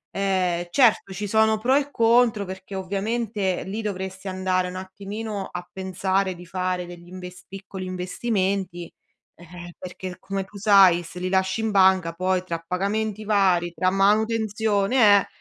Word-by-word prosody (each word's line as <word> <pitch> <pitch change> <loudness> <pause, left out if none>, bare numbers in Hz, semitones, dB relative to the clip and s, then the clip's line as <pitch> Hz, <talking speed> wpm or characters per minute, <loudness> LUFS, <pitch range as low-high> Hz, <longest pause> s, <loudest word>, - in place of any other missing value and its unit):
Ehm, 185 -3 0
certo, 220 -2 +3
ci 205 +3 -4
sono 220 +1 +3
pro 245 +5 +1
e 285 0 +1
contro 230 -4 +3
perché 190 +1 -8
ovviamente 200 +1 -2
lì 205 +4 -4
dovresti 190 -1 -5
andare 185 -1 0
un 180 - -7
attimino 200 +2 -6
a 180 0 -6
pensare 190 0 -1
di 175 +1 -12
fare 180 0 -2
degli 175 0 -12
invest 180 0 -10
piccoli 195 -1 -8
investimenti, 185 -1 -2 0.4
eh-eh, 175 +1 -11
perché 185 0 -7
come 195 0 -3
tu 205 - -20
sai 195 -4 +6
se 175 +1 -11
li 185 +1 -2
lasci 190 +2 +1
in 220 -1 -1
banca 190 -3 +4
poi 185 +1 0
tra 165 -2 -5
pagamenti 210 +4 -2
vari, 185 -5 +2
tra 185 - +1
manutenzione, 210 +1 +3
eh, - - -9
190 Hz, 150 wpm, -24 LUFS, 180-210 Hz, 0.4 s, sai